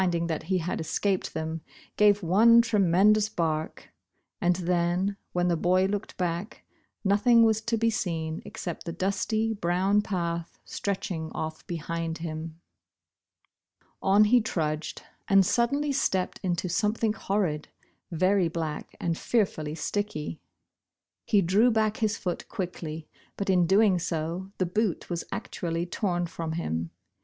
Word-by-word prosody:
23 180 -2 +2
ing 170 - -1
that 160 -2 -2
he 190 +2 +1
had 175 -1 -2
escaped 190 +4 -1
them, 160 0 -3 0.3
gave 205 -1 +4
one 220 +7 +6
tremen 205 -3 +4
dous 215 0 +1
bark, 160 -5 -2 0.5
and 175 0 +3
then 180 +2 0
— - - -50
when 175 0 +1
the 175 - +2
boy 180 +3 +3
looked 200 +1 -3
back, 175 +4 -3 0.4
nothing 225 +4 +5
was 220 -1 +3
to 230 +1 -1
be 230 +1 +2
seen 165 -6 -2
except 175 -3 -6
the - - -1
dusty, 215 +5 0
brown 190 +1 +2
path 170 -4 -3
stretching 180 -5 -3
off 160 0 -5
behind 165 0 -3
him. 160 0 -6 1.4
On 200 +2 +5
he 235 +3 +5
trudged 155 -7 -3 0.2
and 195 -1 +5
suddenly 280 +8 +1
stepped 190 -9 0
into 180 -1 -1
something 215 +4 +1
horrid, 190 -8 -1 0.4
ver}* 185 +1 +2
black 160 -2 -4
and 170 -1 -1
fearfully 160 -9 0
sticky. 170 -3 -3 0.9
He 205 -3 +4
drew 200 +8 +4
back 220 -1 +1
his 220 -3 0
foot 180 -2 -4
quickly, 165 -4 -5 0.3
but 195 -1 0
in 180 -2 +3
doing 195 0 +4
so, 170 +3 -3
the 185 - +1
boot 190 0 -1
was 170 -1 -2
actually 170 0 -3
torn 175 -1 -1
from 165 -1 -5
him. 85 - -2
180 Hz, 145 wpm, -27 LUFS, 165-210 Hz, 1.4 s, one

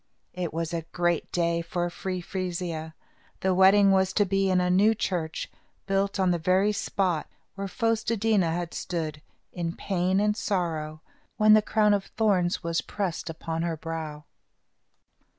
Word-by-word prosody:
It 180 -3 -3
was 165 +1 -3
a 165 - -1
great 175 -1 0
day 170 -1 +1
for 175 +1 -2
Free 185 0 -4
Frisia. 170 -4 -4 0.5
The 190 0 +2
wedding 195 +2 +6
was 190 0 +2
to 205 - +3
be 195 0 +1
in 185 -1 +3
a 180 - +1
new 210 +5 +4
church, 170 -6 -2 0.4
built 195 0 0
on 185 -1 +3
the 175 - 0
very 185 +5 +3
spot 190 -5 -1 0.3
where 195 0 -4
Fos 225 +2 0
te 230 0 0
dí 220 0 +2
na 170 -3 +2
had 170 +1 -3
stood, 155 -4 -4 0.3
in 170 -1 -3
pain 185 0 0
and 210 0 +2
sorrow, 160 -7 -2 0.3
when 215 -1 +6
the 215 - +7
crown 210 0 +3
of 200 -1 0
thorns 190 -5 +1
was 165 0 0
pressed 180 -5 -3
upon 165 0 -4
her 165 -1 -2
brow. 155 -2 -6
180 Hz, 170 wpm, -27 LUFS, 165-195 Hz, 0.5 s, the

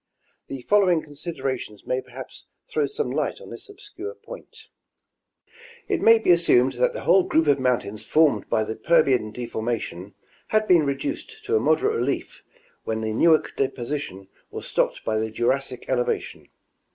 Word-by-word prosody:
The 135 -2 -7
following 185 -4 +3
considerations 135 - -5
may 130 +1 -1
perhaps - - -11 0.2
throw 445 -2 0
some 450 +2 -3
light - - -2
on 485 - -12
this - - -9
obscure 415 +1 -9
point. 465 -3 -12 1.2
It - - -1
may 230 0 +7
be 220 - +2
assumed 150 -7 +4
that - - +1
the - - -5
whole - - +5
group 340 -3 +1
of 140 - +3
mountains 120 -5 -1
formed 155 +6 +2
by 110 - +2
the 110 +1 -4
Permian 140 -9 +2
deformation 110 -5 -4 0.3
had 215 0 +1
been 170 -5 +5
reduced 340 - -4
to 430 +2 +1
a - - +4
moderate 425 +2 +2
relief - - -3 0.4
when 110 0 -3
the 110 0 -2
Newark 160 +7 +3
deposition 125 -7 -3 0.2
was - - -7
stopped - - -1
by 110 0 0
the 110 0 -2
Jurassic 125 +3 -1
elevation. 125 -2 -2
145 Hz, 155 wpm, -24 LUFS, -, 1.2 s, may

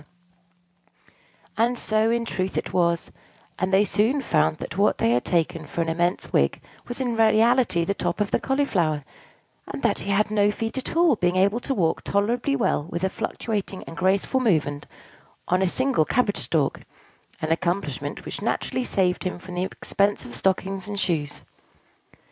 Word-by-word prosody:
And 240 +2 +2
so, 215 0 +2
in 235 0 0
truth, 190 -3 -2
it - - -3
was: 170 -2 +1 0.5
and 185 +1 0
they 195 +2 +5
soon 225 +8 +1
found 155 -6 +2
that - - -7
what 200 +2 +3
they 115 - +2
had 120 +1 +2
taken 165 -2 0
for 170 - -2
an 165 - -1
immense 175 +2 -1
wig - - +2 0.3
was 245 - -5
in 245 -3 -1
reality 225 -4 +4
the 200 - 0
top - - -2
of 205 -1 0
the - - +2
Cauliflower; 185 - 0 0.6
and - - -6
that - - +2
he 200 - -5
had 210 +2 +2
no 205 -1 +3
feet 225 +2 -3
at 260 - -6
all, 330 -7 +4
being 180 -1 +1
able 200 +5 +3
to 270 +2 -3
walk 165 -6 0
tolerably 235 +7 0
well 230 - 0
with 170 +1 -4
a 190 - +2
fluctuating 210 -2 -3
and 165 - -10
graceful 195 +8 +1
movement 150 - 0 0.6
on 180 +1 +2
a 190 - +3
single 260 -2 +2
cabbage 205 +4 0
stalk, 150 -4 0 0.6
an 155 - -2
accomplishment 175 +3 -2
which - - -6
naturally 255 - -1
saved 185 -6 0
him 185 -2 -3
the 180 0 -5
expense 200 +1 -1
of 120 - -9
stockings 190 - -1
and 205 -1 -4
shoes. 155 -6 -1
195 Hz, 170 wpm, -24 LUFS, 170-225 Hz, 0.6 s, they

